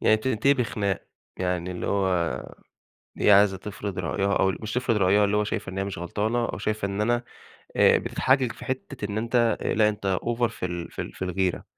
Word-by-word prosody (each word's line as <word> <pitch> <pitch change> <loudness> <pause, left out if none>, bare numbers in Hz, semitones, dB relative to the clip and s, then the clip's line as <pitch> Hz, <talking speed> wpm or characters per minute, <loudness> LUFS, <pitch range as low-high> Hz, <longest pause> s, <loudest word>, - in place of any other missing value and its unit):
يعني 110 - +5
بتنتهي 130 +4 +2
بخناق. 105 -7 -1 0.3
يعني 90 -1 -2
اللي 90 - -4
هو 100 -1 +1 1.1
هي 105 - +5
عايزة 100 -1 +6
تفرض 100 0 -6
رأيها 95 +3 0
أو 95 - +3
ال - - -5
مش 110 0 -4
تفرض 120 -2 +1
رأيها، 100 +1 +4
اللي 100 +1 +1
هو 105 - +2
شايفة 105 -2 -3
إن 95 - -5
هي 95 - 0
مش 100 -3 -5
غلطانة 110 +7 -1
وشايفة 110 -2 -2
إن 100 +1 -3
أنا 120 +3 +1 0.5
آآ - - +6
بتتحجج 130 -2 +1
في - - -11
حتة 130 -2 -4
إن 100 +1 -3
أنتَ، 115 +2 -1 0.3
آآ - - 0
لأ، 105 -1 +4
أنتَ 100 -3 -1
أوڤر 120 +1 +1
في 105 - -4
ال 85 -1 -5
في - - -4
ال - - -8
في - - -9
الغيرة، 95 0 -1
105 Hz, 210 wpm, -26 LUFS, 95-115 Hz, 1.1 s, عايزة